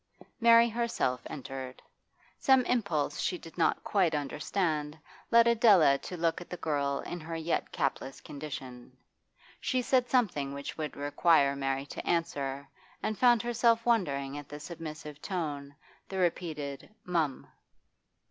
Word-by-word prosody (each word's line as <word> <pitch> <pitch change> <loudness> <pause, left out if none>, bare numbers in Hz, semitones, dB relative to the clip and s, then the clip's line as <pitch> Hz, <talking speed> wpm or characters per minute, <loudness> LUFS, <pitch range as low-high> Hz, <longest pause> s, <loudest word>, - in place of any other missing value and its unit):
Mary 230 0 +7
herself 230 - -1
entered. 130 -2 -7 0.6
Some 265 -2 +4
impulse 170 -13 0
she 180 +1 -1
did 165 -1 -13
not 170 - +1
quite 180 -6 +2
understand 150 +1 -2 0.3
led 235 0 +6
Adela 205 - +5
to 180 - -7
look 165 0 0
at 175 - -11
the 180 - -5
girl 140 -3 -1
in 175 - -6
her 165 +1 -6
yet 165 +1 -2
capless 135 -1 -2
condition. 130 -4 -8 0.6
She 255 -2 0
said 250 0 +2
something 175 - +1
which 140 0 -6
would 155 -2 -5
require 145 0 +3
Mary 135 0 -2
to - - -7
answer, 140 -5 -1 0.4
and 215 - -1
found 240 0 +4
herself 235 -1 +2
wondering 145 - 0
at 145 - -12
the 145 - -7
submissive 155 -2 -8
tone, 145 -7 -4 0.3
the 190 - -4
repeated 155 -6 -2 0.2
'Mum. 165 -6 -1
160 Hz, 140 wpm, -30 LUFS, 140-200 Hz, 0.6 s, Mary